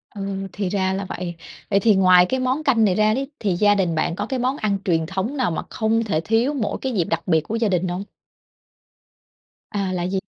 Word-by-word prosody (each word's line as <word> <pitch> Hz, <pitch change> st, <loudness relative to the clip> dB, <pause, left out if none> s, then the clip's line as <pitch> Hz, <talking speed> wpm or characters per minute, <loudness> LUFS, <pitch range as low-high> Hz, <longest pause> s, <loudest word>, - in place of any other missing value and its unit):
Ừ, 195 Hz, -1 st, -4 dB
thì 195 Hz, -1 st, -2 dB
ra 190 Hz, -1 st, 0 dB
là 195 Hz, +1 st, -3 dB
vậy. 175 Hz, -1 st, -5 dB, 0.3 s
Vậy 195 Hz, -, +3 dB
thì 215 Hz, 0 st, +4 dB
ngoài 185 Hz, -1 st, +6 dB
cái 260 Hz, +7 st, -1 dB
món 255 Hz, +4 st, 0 dB
canh 235 Hz, -7 st, +3 dB
này 185 Hz, -, +2 dB
ra 215 Hz, +1 st, +3 dB
đấy, 270 Hz, +4 st, -3 dB
thì 200 Hz, -4 st, 0 dB
gia 205 Hz, +3 st, +4 dB
đình 180 Hz, -4 st, 0 dB
bạn 160 Hz, +1 st, 0 dB
có -, -, -3 dB
cái 260 Hz, -2 st, -3 dB
món 255 Hz, +3 st, 0 dB
ăn 210 Hz, -6 st, 0 dB
truyền 165 Hz, -3 st, +1 dB
thống 190 Hz, -, -3 dB
nào 255 Hz, -9 st, +1 dB
mà 160 Hz, -, -2 dB
không 225 Hz, +1 st, 0 dB
thể 160 Hz, -7 st, -1 dB
thiếu 230 Hz, -, +1 dB
mỗi 220 Hz, -7 st, -2 dB
cái 260 Hz, -1 st, -2 dB
dịp 185 Hz, -6 st, +2 dB
đặc -, -, -3 dB
biệt 160 Hz, -3 st, +3 dB
của 210 Hz, +8 st, -5 dB
gia 230 Hz, -2 st, +1 dB
đình 185 Hz, -1 st, 0 dB
không? 180 Hz, +2 st, -3 dB, 1.7 s
À, 195 Hz, -3 st, -2 dB
là 175 Hz, -1 st, -2 dB
gì? 190 Hz, +1 st, -1 dB
200 Hz, 240 wpm, -22 LUFS, 185-225 Hz, 1.7 s, ngoài